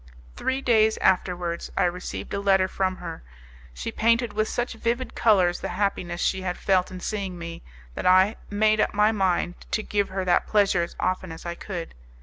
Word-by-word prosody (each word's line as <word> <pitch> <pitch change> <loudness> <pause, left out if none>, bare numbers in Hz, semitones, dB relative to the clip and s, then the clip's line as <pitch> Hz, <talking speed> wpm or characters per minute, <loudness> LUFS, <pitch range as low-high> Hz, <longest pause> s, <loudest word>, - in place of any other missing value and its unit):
Three 260 +1 -1
days 220 -4 +3
afterwards 175 -2 0
I - - +3
received 180 +1 -3
a 200 - -1
letter 195 -1 +3
from 190 0 -1
her. 185 - -7 0.5
She - - -5
painted 230 0 +2
with 215 +1 0
such 240 +2 -2
vivid 235 +2 -2
colours 185 -6 +3
the - - -4
happiness 180 -4 -1
she 190 +1 0
had 180 -1 -3
felt 185 -2 +2
in 185 -1 -8
seeing 195 -2 -4
me, 170 -1 -7 0.3
that - - -2
I 185 +4 +5
made 215 +1 +2
up - - 0
my 210 +1 +4
mind 185 -4 0
to 215 - -1
give 205 -1 0
her 190 0 -3
that 180 - +2
pleasure 200 -4 +3
as 170 - -4
often 185 -1 -1
as 160 +1 -10
I 170 - -3
could. 170 -1 -6
190 Hz, 190 wpm, -25 LUFS, 180-215 Hz, 0.5 s, I